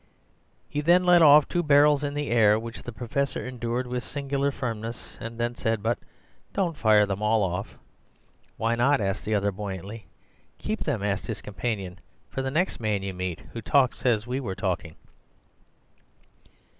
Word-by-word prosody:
"He 150 - -2
then 175 +4 +4
let 175 -1 +6
off 150 -1 +8
two 175 - 0
barrels 145 -1 +5
in 145 0 -2
the 145 -3 -2
air, 110 -3 +5
which 115 +1 -7
the 120 - -7
Professor 125 +4 -2
endured 125 0 -3
with 125 0 -3
singular 140 0 -1
firmness, 115 -4 -5
and 115 +1 -7
then 120 0 0
said, 115 -3 -2
'But 115 +2 0 0.5
don't 180 -5 0
fire 110 -5 +4
them 100 0 -3
all 110 0 +3
off.' 90 +2 -3 0.8
"'Why 115 +1 +1
not' 135 +5 +3
asked 95 -1 -2
the 110 0 +1
other 100 0 +1
buoyantly. 100 +2 -7 0.5
"'Keep - - -3
them,' - - -1
asked 100 0 -1
his 110 - -5
companion, 100 -4 -4 0.3
'for 135 - -2
the 135 - -2
next 165 +7 0
man 105 -3 -1
you 95 -1 -4
meet 90 -2 -4
who 115 - -5
talks 130 +1 +2
as 115 -4 +2
we 125 +2 -2
were 100 -8 -4
talking. 90 -4 -3
115 Hz, 170 wpm, -26 LUFS, 105-140 Hz, 0.8 s, off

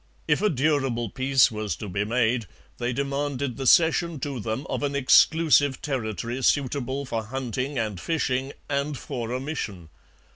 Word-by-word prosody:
If 150 +3 +2
a 210 - +3
durable 135 - 0
peace 130 -1 +3
was 105 -2 -3
to 105 - -7
be 100 +2 -1
made, 115 0 +1 0.3
they 120 +1 -1
demanded 140 -1 -2
the 135 -1 -3
cession 165 +1 +4
to 140 -4 -3
them 110 +5 -3
of - - -3
an 140 -1 -1
exclusive 145 0 +4
territory 120 -2 -3
suitable 135 0 0
for 115 -3 -3
hunting 130 +3 -3
and 105 -5 -2
fishing 135 -5 -1 0.2
and 140 0 -1
for 120 -5 -5
a 125 - -1
mission. 110 - -5
130 Hz, 155 wpm, -25 LUFS, 115-145 Hz, 0.3 s, cession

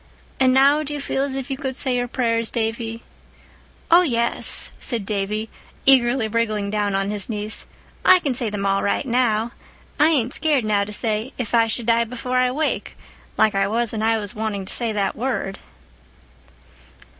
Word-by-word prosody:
And 260 -1 +4
now 280 +3 +5
do 295 -1 -3
you - - -4
feel 275 -1 -2
as 275 -1 -3
if 270 0 -5
you 265 - -2
could 265 -2 -4
say 260 -2 -1
your 245 0 -1
prayers, 230 -2 0
Davy?" 230 0 -3 0.9
"Oh, 345 +2 +8
yes," 235 -8 0
said 230 -6 -3
Davy, 210 +1 -2 0.4
eagerly 250 -3 +4
wriggling 215 -2 -1
down 205 -2 0
on 195 +1 -1
his 205 0 -3
knees, 210 0 -4 0.4
"I 370 - +7
can 295 -7 -1
say 240 -2 -2
them 205 -1 -4
now 195 0 +2
all - - -1
right. 200 - 0
I 230 -2 +1 0.5
ain't 260 -6 +1
scared 295 -7 +1
now 205 -1 +1
to 210 - -8
say 220 +3 -1
'if 245 -3 -4
I 230 -1 +4
should 225 +1 -3
die 235 0 +3
before 250 +2 -3
I 255 0 +3
wake,' 300 +5 -2 0.4
like 220 -1 +4
I 195 0 +1
was 230 +2 -1
when 220 - -3
I 225 0 +2
was 205 -2 -4
wanting 210 -3 -3
to - - 0
say 235 -2 +2
that 200 -2 -1
word." 225 -5 -3
230 Hz, 190 wpm, -22 LUFS, 210-255 Hz, 0.9 s, Oh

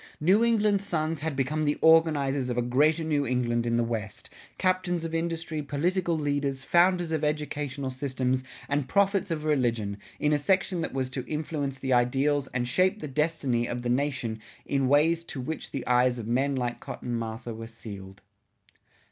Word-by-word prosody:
New 190 +8 +4
England's 210 -4 +2
sons 160 -4 -1
had 155 0 -3
become 145 +4 0
the 145 -1 +1
organizers 145 -5 +4
of 120 - -2
a 120 - +2
Greater 150 +7 +2
New 150 -2 +1
England 120 -2 0
in 115 - +1
the 120 - +2
West, 110 -3 -5 0.3
captains 180 -2 0
of 165 - -5
industry, 165 -1 -2
political 170 +4 0
leaders, 145 -2 -1
founders 175 +2 +3
of 160 -1 -1
educational 150 -3 -2
systems, 130 -1 -1 0.2
and 140 -2 0
prophets 200 -1 +2
of 160 -2 -2
religion, 115 -9 0 0.2
in 150 0 +2
a 145 - +2
section 185 +2 +1
that 160 - -3
was 130 -1 -2
to 130 -1 -4
influence 150 -3 -3
the 130 -1 -1
ideals 135 +3 +2
and 120 -1 -2
shape 185 - +2
the 150 - -5
destiny 135 -5 0
of 120 0 -4
the 120 - -1
nation 125 -4 -1 0.3
in 135 -2 +1
ways 160 +4 +3
to 160 - -7
which 155 +6 -4
the 135 - -5
eyes 125 0 +3
of 115 - -5
men 135 +4 +1
like 120 -2 -2
Cotton 120 -1 -5
Mather 115 +1 -5
were 115 0 -7
sealed. 100 -3 -10
145 Hz, 180 wpm, -27 LUFS, 125-160 Hz, 0.3 s, New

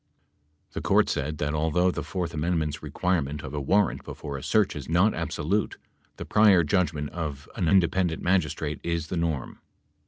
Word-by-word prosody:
The - - -5
Court - - +3
said 75 +3 -2
that, 75 0 -1
although 80 +4 +2
the - - -4
fourth 90 -3 -4
amendment's 80 -2 -1
requirement 75 -6 -1
of 65 - -7
a 75 - -2
warrant 100 +7 +1
before 70 - -7
a 70 - -5
search 105 +5 +2
is 75 -1 -7
not 90 +6 +3
absolute, 100 +8 -1 0.4
the - - -6
prior 100 -5 +5
judgment 75 -3 0
of 75 -4 -5
an 90 -7 0
independent 90 -1 +2
magistrate 90 -4 0
is 85 -2 -2
the 90 - -2
norm. 80 -6 -2
85 Hz, 165 wpm, -26 LUFS, 75-90 Hz, 0.4 s, prior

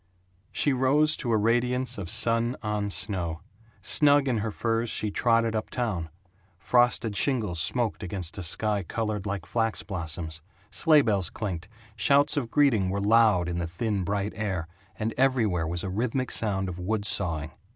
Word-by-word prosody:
She 145 - +1
rose 145 +4 +2
to 120 - -3
a 110 - +3
radiance 120 +3 +1
of 90 -4 -5
sun 115 +5 +2
on 105 -1 -2
snow. 85 -5 -1 0.4
Snug 145 -2 +5
in 120 -4 +1
her 110 +2 -2
furs 115 +2 -1
she 105 -1 -1
trotted 115 0 +1
up 110 - -3
town. 100 -10 -3 0.5
Frosted 120 +1 +2
shingles 105 - 0
smoked 120 +1 -1
against 95 -2 -4
a - - -4
sky 105 +4 0
colored 105 +2 -3
like 100 0 -4
flax 115 -2 -1
blossoms, 80 -3 -4 0.3
sleigh 155 -3 +4
bells 100 -6 +1
clinked, 90 -4 -5 0.3
shouts 140 +7 +4
of 130 -6 -2
greeting 115 -9 +2
were 100 +2 -2
loud 105 -4 +4
in 85 0 -3
the 85 - -2
thin 100 +3 -2
bright 100 +2 -2
air, 95 -6 -3 0.3
and 110 +1 -2
everywhere 115 -11 +1
was 85 +2 -2
a 95 - -3
rhythmic 125 +5 -2
sound 95 -4 0
of 90 -1 -6
wood 100 +3 -2
sawing. 80 -7 -2
105 Hz, 165 wpm, -26 LUFS, 95-120 Hz, 0.5 s, Snug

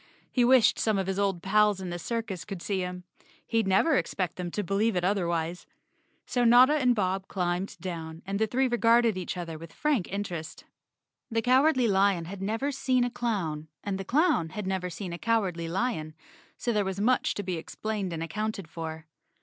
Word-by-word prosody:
He 250 - +3
wished 250 -1 +5
some 215 -2 +2
of 195 - 0
his 195 +1 -2
old 195 -4 0
pals 210 0 +3
in 185 -2 -5
the 175 - -4
circus 225 -4 -3
could 195 +2 -6
see 195 -2 -1
him. 180 0 -4 0.4
He'd 225 -3 0
never 240 +12 +4
expect 185 -5 -2
them 180 -1 -4
to 205 +4 -3
believe 200 +3 +1
it 180 - 0
otherwise. 175 -3 -1 0.6
So 245 - 0
Notta 245 +4 +7
and 255 -5 +3
Bob 190 -2 -1
climbed 180 0 -2
down 165 -2 -6
and 195 +1 -2
the 220 - +2
three 260 +4 +1
regarded 235 -2 +3
each 185 0 -4
other 165 -3 -5
with 165 0 -10
frank 290 -13 0
interest. 180 -6 -5 0.6
The 225 0 0
Cowardly 260 +1 +4
Lion 195 -4 +2
had 190 +3 -8
never 225 +8 -1
seen 255 -2 +1
a 245 - -1
clown 175 -12 -2 0.2
and 195 -1 -3
the - - -3
clown 275 - +2
had 210 +4 -5
never 190 -1 -2
seen 180 0 -6
a 170 - -6
Cowardly 195 -8 0
Lion, 170 -5 -2 0.4
so 240 - -1
there 210 -1 +2
was 190 0 -3
much 250 +5 +2
to 205 - -3
be 180 -2 -2
explained 200 +3 -4
and 165 -1 -3
accounted 200 +2 -3
for. 160 0 -6
195 Hz, 195 wpm, -28 LUFS, 175-230 Hz, 0.6 s, Notta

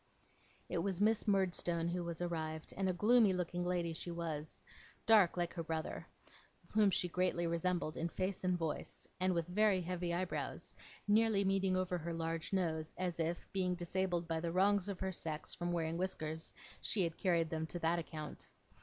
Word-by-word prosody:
It 175 - -1
was 190 +1 -1
Miss 220 +2 +3
Murdstone 175 -4 +1
who 175 0 -1
was 170 0 -4
arrived, 160 -2 -3
and 190 -1 0
a - - +4
gloomy 210 +3 +5
looking 180 0 -1
lady 175 -2 0
she 170 - -5
was; 160 -3 -4 0.4
dark, 210 -7 +6
like 175 -1 -1
her 170 - -3
brother, 160 -1 -3 0.6
whom 210 -2 +5
she 180 -1 +1
greatly 175 0 +1
resembled 170 -1 0
in 170 - -1
face 185 +2 -2
and 180 -1 +2
voice; 165 -3 -4
and 185 0 +2
with 170 -1 +1
very 200 +2 +3
heavy 175 0 -2
eyebrows, 175 +1 -3 0.3
nearly 210 -1 +4
meeting 195 -1 +2
over 180 -1 0
her 170 +1 -4
large 165 0 -2
nose, 160 -5 -1
as 180 -2 -2
if, 165 +1 -1
being 185 -2 +1
disabled 175 0 -1
by 165 -1 0
the 165 0 -2
wrongs 200 +2 +3
of 195 - -4
her 190 0 0
sex 160 -3 -2
from 175 0 -2
wearing 165 -1 -1
whiskers, 160 -3 -2 0.3
she 200 - +1
had 165 -1 -1
carried 170 -4 +1
them 160 0 -1
to 175 - -4
that 170 0 +1
account. 155 -2 -7
175 Hz, 180 wpm, -36 LUFS, 165-185 Hz, 0.6 s, dark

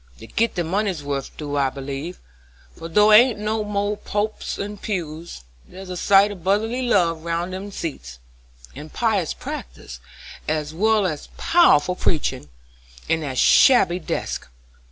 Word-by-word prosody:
They 110 - -11
git 230 - -1
their 175 -2 -1
money's 190 -2 -1
wuth 140 -1 -3
I - - -27
do 145 -2 -1
believe, 140 +5 -6 0.6
for 165 0 -8
though 210 +5 +5
there 210 - +10
ain't 245 -2 +3
no 215 0 -2 0.3
pulpits 210 +1 -3
and 205 0 -6
pews, 165 - -5 0.2
there's 185 0 -10
a - - -4
sight 200 +3 +4
of 185 -5 -10
brotherly 220 +6 0
love 175 -9 +1
round 170 +2 -2
in 190 - -4
them 205 - -9
seats, 65 - -6 0.6
and 150 +3 -9
pious 210 -8 0
practice, - - -8 0.5
as 155 0 -2
well 215 +3 +2
as 155 -5 -3
powerful 180 - +4
preaching, 150 - -1 0.6
in 165 - +1
that 135 -4 -4
shabby 185 - +5
desk. 160 - -4
180 Hz, 155 wpm, -22 LUFS, 150-210 Hz, 0.6 s, there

